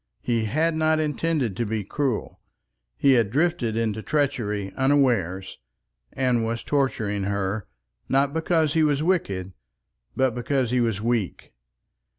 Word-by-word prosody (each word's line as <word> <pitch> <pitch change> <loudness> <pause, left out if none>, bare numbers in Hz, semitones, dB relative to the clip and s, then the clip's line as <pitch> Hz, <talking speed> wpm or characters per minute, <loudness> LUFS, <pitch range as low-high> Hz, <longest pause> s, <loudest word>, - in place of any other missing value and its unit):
He 115 -2 0
had 160 +9 +1
not 155 0 +2
intended 150 - 0
to 120 - 0
be 110 -1 -2
cruel. 130 +3 -2 0.6
He 140 - +4
had 115 -6 +3
drifted 135 -4 0
into 110 -2 -1
treachery 110 -9 -1
unawares, 120 - +1 0.5
and 125 -3 +1
was 115 +1 -2
torturing 110 -8 0
her, 100 +1 -2 0.4
not 140 +1 +2
because 160 -2 +1
he 160 - +3
was 150 -1 +2
wicked, 100 - -1 0.6
but 130 -2 +2
because 125 0 -1
he 125 -1 +2
was 110 -3 -1
weak. 115 -5 -2
125 Hz, 135 wpm, -24 LUFS, 110-145 Hz, 0.6 s, He